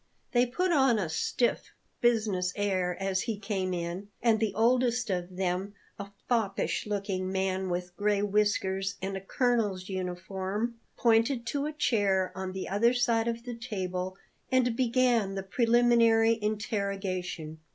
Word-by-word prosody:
They 245 Hz, 0 st, +3 dB
put 360 Hz, +9 st, 0 dB
on 265 Hz, -7 st, +4 dB
a 185 Hz, -6 st, -1 dB
stiff, 235 Hz, +9 st, -1 dB, 0.3 s
business 215 Hz, -6 st, +2 dB
air 185 Hz, -3 st, 0 dB
as 195 Hz, -1 st, 0 dB
he 225 Hz, -3 st, -3 dB
came 195 Hz, -2 st, -2 dB
in, 175 Hz, +2 st, -4 dB
and 225 Hz, -2 st, +3 dB
the 210 Hz, -3 st, -1 dB
oldest 240 Hz, 0 st, +2 dB
of 180 Hz, 0 st, -3 dB
them, 190 Hz, +2 st, -2 dB, 0.2 s
a 200 Hz, 0 st, -6 dB, 0.2 s
foppish 220 Hz, -4 st, 0 dB
looking 195 Hz, -2 st, -2 dB
man 190 Hz, 0 st, -1 dB
with 180 Hz, 0 st, -3 dB
gray 205 Hz, 0 st, +1 dB
whiskers 200 Hz, -1 st, +1 dB
and 195 Hz, +1 st, -3 dB
a 190 Hz, -, -4 dB
colonel's 205 Hz, -4 st, 0 dB
uniform, 190 Hz, +5 st, -3 dB, 0.2 s
pointed 235 Hz, +1 st, +3 dB
to 285 Hz, +5 st, -1 dB
a -, -, -3 dB
chair 200 Hz, -10 st, +1 dB
on 190 Hz, 0 st, -4 dB
the 190 Hz, -, -4 dB
other 230 Hz, +6 st, +2 dB
side 235 Hz, -2 st, +2 dB
of 235 Hz, 0 st, -2 dB
the 245 Hz, 0 st, -5 dB
table 185 Hz, -5 st, -4 dB, 0.3 s
and 250 Hz, -2 st, +3 dB
began 240 Hz, -5 st, +2 dB
the 195 Hz, -, -3 dB
preliminary 230 Hz, +1 st, +4 dB
interrogation. 195 Hz, -6 st, -3 dB
205 Hz, 145 wpm, -29 LUFS, 190-235 Hz, 0.3 s, on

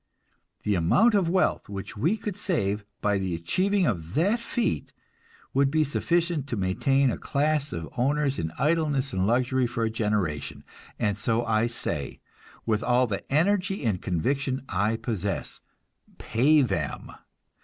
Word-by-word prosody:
The 105 Hz, -, +1 dB
amount 100 Hz, -, +4 dB
of 190 Hz, -5 st, +2 dB
wealth 185 Hz, -, +1 dB
which 100 Hz, -1 st, -6 dB
we 160 Hz, -, +1 dB
could 210 Hz, -3 st, -4 dB
save 105 Hz, -, -1 dB, 0.2 s
by 100 Hz, -1 st, +1 dB
the 95 Hz, -3 st, -2 dB
achieving 185 Hz, -, +1 dB
of 85 Hz, -, -2 dB
that 200 Hz, +9 st, +2 dB
feat 235 Hz, 0 st, -2 dB, 0.6 s
would 140 Hz, 0 st, +3 dB
be 155 Hz, +2 st, +2 dB
sufficient 170 Hz, 0 st, 0 dB
to 125 Hz, -, -2 dB
maintain 130 Hz, +8 st, +2 dB
a -, -, -4 dB
class 150 Hz, +1 st, 0 dB
of 80 Hz, -1 st, -5 dB
owners 140 Hz, +2 st, +1 dB
in 80 Hz, -1 st, -2 dB
idleness 150 Hz, -3 st, +1 dB
and 95 Hz, +1 st, +1 dB
luxury 125 Hz, +2 st, +2 dB
for 120 Hz, -1 st, -2 dB
a 110 Hz, -, 0 dB
generation; 105 Hz, -9 st, -2 dB, 0.3 s
and 105 Hz, -3 st, 0 dB
so 115 Hz, +2 st, +1 dB
I 110 Hz, 0 st, +2 dB
say, 75 Hz, -11 st, -4 dB, 0.5 s
with 110 Hz, -2 st, +1 dB
all 125 Hz, +2 st, +3 dB
the 105 Hz, 0 st, -5 dB
energy 195 Hz, +2 st, +1 dB
and 100 Hz, -6 st, 0 dB
conviction 130 Hz, -, -1 dB
I 105 Hz, +3 st, +1 dB
possess, 100 Hz, -5 st, -3 dB, 0.6 s
pay 140 Hz, +6 st, +3 dB
them! 100 Hz, -7 st, -3 dB
125 Hz, 150 wpm, -26 LUFS, 105-155 Hz, 0.6 s, amount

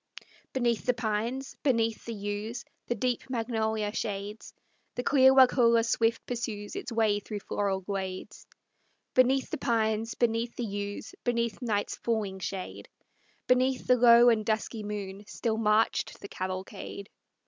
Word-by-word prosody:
Beneath 240 Hz, -3 st, 0 dB
the 250 Hz, -, +3 dB
pines, 230 Hz, +4 st, -2 dB
beneath 230 Hz, -5 st, +1 dB
the 230 Hz, -, -4 dB
yews, 205 Hz, +4 st, -4 dB, 0.2 s
the 240 Hz, -, 0 dB
deep 250 Hz, +3 st, -2 dB
magnolia 220 Hz, -3 st, -1 dB
shades, 205 Hz, 0 st, -4 dB, 0.4 s
The 245 Hz, -, -2 dB
clear 265 Hz, -1 st, +6 dB
Waukulla 245 Hz, -3 st, +5 dB
swift 230 Hz, 0 st, +1 dB
pursues 225 Hz, -4 st, -4 dB
its 255 Hz, -, -5 dB
way 220 Hz, -3 st, +2 dB
through 205 Hz, 0 st, -6 dB
floral 195 Hz, -2 st, -1 dB
glades; 190 Hz, -1 st, -5 dB, 0.7 s
Beneath 260 Hz, +1 st, +3 dB
the 315 Hz, -, -3 dB
pines, 225 Hz, -2 st, 0 dB
beneath 235 Hz, 0 st, 0 dB
the 240 Hz, -, -3 dB
yews, 205 Hz, -1 st, -5 dB
beneath 235 Hz, -2 st, -1 dB
night's 210 Hz, -4 st, -1 dB
falling 210 Hz, -5 st, -2 dB
shade, 190 Hz, 0 st, -6 dB, 0.6 s
Beneath 255 Hz, +1 st, +2 dB
the 250 Hz, -, +5 dB
low 240 Hz, 0 st, +7 dB
and 220 Hz, -2 st, +2 dB
dusky 220 Hz, +1 st, -2 dB
moon 205 Hz, -1 st, -5 dB
still 220 Hz, -2 st, -2 dB
marched 220 Hz, 0 st, +1 dB
the -, -, -8 dB
cavalcade. 190 Hz, +1 st, -6 dB
225 Hz, 135 wpm, -29 LUFS, 205-240 Hz, 0.7 s, low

